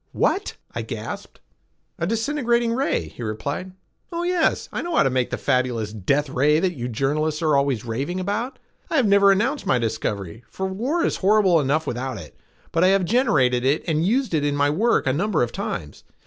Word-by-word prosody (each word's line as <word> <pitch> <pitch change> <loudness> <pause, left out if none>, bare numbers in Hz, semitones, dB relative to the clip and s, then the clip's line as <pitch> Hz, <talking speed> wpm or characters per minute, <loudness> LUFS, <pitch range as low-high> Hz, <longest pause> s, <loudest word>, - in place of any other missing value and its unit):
"What?" 405 - 0 0.2
I - - -3
gasped. - - -7 0.6
"A 170 - -1
disintegrating 235 0 +1
ray," 270 +4 0
he - - -12
replied. 140 - -4 0.4
"Oh 340 0 -2
yes, 355 -2 +1
I - - -2
know 345 -1 -3
how - - +5
to 135 - +1
make 125 -1 0
the - - -3
fabulous 120 -4 0
'death 140 +9 0
ray' 145 +4 +2
that 180 +1 0
you 125 -5 -4
journalists 150 +6 -1
are 155 -2 +3
always 140 -5 +1
raving 135 +11 -3
about. 210 +7 -2 0.3
I - - -2
have 270 -6 +4
never 200 -1 +6
announced 235 +9 0
my 130 - +3
discovery, 110 -3 -3
for 190 - -4
war 250 - -1
is - - 0
horrible 195 -3 +4
enough 150 +3 +1
without 130 -1 -3
it, 80 -6 -11 0.4
but 165 - +2
I - - +6
have 195 -1 +3
generated 150 - +2
it 140 +4 +1
and 160 -1 +1
used 240 +4 +1
it 150 -2 +1
in 145 0 0
my 145 0 +2
work 225 +10 +2
a 130 - +2
number 195 +1 +1
of 120 - -2
times. 75 -1 -5
155 Hz, 200 wpm, -23 LUFS, 130-215 Hz, 0.6 s, never